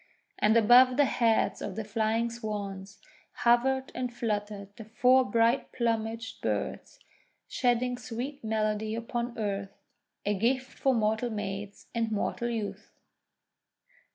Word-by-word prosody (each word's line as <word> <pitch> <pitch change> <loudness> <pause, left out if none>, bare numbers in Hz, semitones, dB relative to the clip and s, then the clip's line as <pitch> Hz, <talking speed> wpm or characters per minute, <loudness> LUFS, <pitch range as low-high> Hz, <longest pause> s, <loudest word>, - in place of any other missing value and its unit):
And 215 +2 +4
above 245 +3 +6
the 290 - +5
heads 230 -4 +1
of - - -5
the 220 - -3
flying 220 +2 0
Swans 205 -3 -5 0.5
hovered 260 +3 +3
and 250 -1 -3
fluttered 205 -3 -4
the 225 - -10
four 250 +4 +4
bright 230 +3 +1
plumaged 225 -1 -2
birds - - -3 0.5
shedding 245 0 0
sweet 250 +4 -6
melody 215 0 -1
upon 235 +1 -4
earth 200 -2 -3 0.3
— - - -53
a 205 - +2
gift 255 +6 -1
for 265 -1 +3
mortal 220 +2 +1
maids 200 -2 -5
and 230 -1 -1
mortal 235 +3 -1
youths. 220 -3 -4
225 Hz, 125 wpm, -29 LUFS, 210-245 Hz, 0.5 s, above